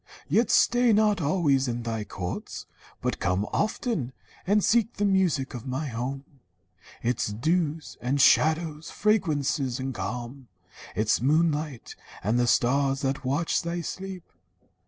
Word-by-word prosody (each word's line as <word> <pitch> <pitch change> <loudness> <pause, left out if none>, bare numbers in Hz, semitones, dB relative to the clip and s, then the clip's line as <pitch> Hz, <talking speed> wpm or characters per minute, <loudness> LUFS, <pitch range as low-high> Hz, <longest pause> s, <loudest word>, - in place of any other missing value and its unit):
Yet 230 0 +2
stay 245 -1 +4
not 210 -3 +3
always 145 -4 +2
in 120 -1 -3
thy 115 -2 -3
courts, 90 -3 -6 0.4
but - - -1
come 95 +3 0
Often, 210 - -1 0.3
and 205 +1 +3
seek 230 0 +2
the 205 - 0
music 185 -9 +1
of 120 0 -7
my 135 +3 -3
home, 130 +4 -4 0.8
Its 120 +1 0
dews 155 - -1
and 130 +3 0
shadows, 155 +2 +3
fragrances 150 - 0
and 130 0 -3
calm, 125 +2 -5 0.5
Its 110 +1 +1
moonlight, 150 -1 0 0.3
and 110 +5 +1
the 120 - +2
stars 135 +3 +2
that 135 +2 -1
watch 145 +6 0
thy 170 +1 -3
sleep.' 185 +2 -6
145 Hz, 135 wpm, -26 LUFS, 125-175 Hz, 0.8 s, stay